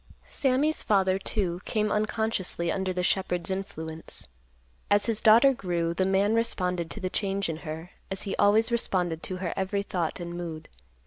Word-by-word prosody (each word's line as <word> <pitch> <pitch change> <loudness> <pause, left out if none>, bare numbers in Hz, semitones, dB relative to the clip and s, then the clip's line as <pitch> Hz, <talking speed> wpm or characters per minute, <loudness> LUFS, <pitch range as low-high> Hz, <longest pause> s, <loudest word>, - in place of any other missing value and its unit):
Sammy's 280 +3 +1
father, 190 -2 +2
too, 185 -3 -1
came 215 -1 0
unconsciously 210 -5 -1
under 190 -1 -1
the 180 0 -2
shepherd's 180 -1 0
influence. 160 - -6 0.6
As 205 0 +4
his 225 -2 +2
daughter 235 +5 +7
grew, 170 -6 -1
the 185 +2 +1
man 195 +2 +3
responded 180 -7 0
to 215 - -6
the 185 - -2
change 195 -1 0
in 160 - -3
her, 160 +1 -7 0.2
as 195 - -2
he 195 - -3
always 220 +3 +4
responded 180 -8 0
to 185 - -4
her 180 -2 -3
every 195 +1 -1
thought 175 -4 -2
and 175 0 -5
mood. 165 -3 -6
190 Hz, 170 wpm, -27 LUFS, 175-210 Hz, 0.6 s, daughter